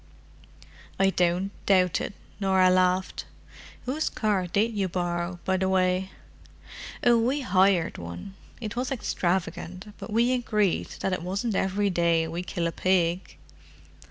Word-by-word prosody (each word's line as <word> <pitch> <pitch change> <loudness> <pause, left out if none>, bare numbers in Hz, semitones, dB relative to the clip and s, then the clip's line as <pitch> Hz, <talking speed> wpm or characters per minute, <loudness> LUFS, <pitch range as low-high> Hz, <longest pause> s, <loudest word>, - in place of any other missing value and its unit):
"I 195 0 +4
don't 180 +2 +1 0.2
doubt 185 -4 +3
it," 200 - -5 0.2
Norah 190 -2 +4
laughed. 185 0 +1 0.6
"Whose 285 +5 -1
car 205 -4 0
did 215 +6 +1
you 195 -2 0
borrow, 175 0 -2
by 190 0 +2
the 190 0 0
way?" 185 0 +1 0.9
"Oh, 240 -1 +5
we 260 +6 +1
hired 190 -6 +2
one. 85 - -7 0.3
It 220 -3 -5
was 250 +2 -2
extravagant, 185 -3 -2
but - - -7
we 235 +3 +3
agreed 210 -6 +1
that 190 - 0
it 185 - -2
wasn't 195 +6 -2
every 195 +1 +1
day 170 -2 +2
we 165 +2 -4
kill 175 -1 -3
a 170 - 0
pig!" 180 0 0
190 Hz, 140 wpm, -26 LUFS, 180-205 Hz, 0.9 s, Oh